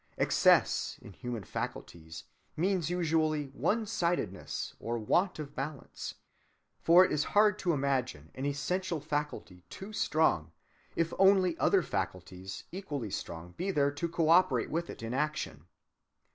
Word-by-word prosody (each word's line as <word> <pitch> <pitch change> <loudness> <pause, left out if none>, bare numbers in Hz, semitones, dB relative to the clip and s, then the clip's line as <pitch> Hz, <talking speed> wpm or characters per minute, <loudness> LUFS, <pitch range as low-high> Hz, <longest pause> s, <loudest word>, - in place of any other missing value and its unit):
Excess, - - +3
in 100 - -11
human 120 +1 -5
faculties, 80 -2 -6 0.3
means 180 -1 +1
usually 155 -4 +1
one‐sidedness 175 - -1
or 120 +1 -2
want 175 - +1
of 145 -2 -7
balance; 140 0 -6 0.6
for 175 +3 +7
it - - -3
is 150 - +1
hard 210 -1 +5
to 180 - +1
imagine 130 - -1
an 130 - -6
essential 165 +5 -1
faculty 150 - -4
too 200 +3 -9
strong, 155 - +1 0.4
if 165 -1 0
only 190 -3 +5
other 195 -3 +4
faculties 95 - -5
equally 145 - -5
strong 85 0 -6
be 185 +3 -2
there 145 -6 +2
to 145 +4 -3
coöperate 170 +3 +3
with 170 +2 -2
it - - -8
in 115 +2 -4
action. 135 - -2
150 Hz, 130 wpm, -31 LUFS, 115-175 Hz, 0.6 s, for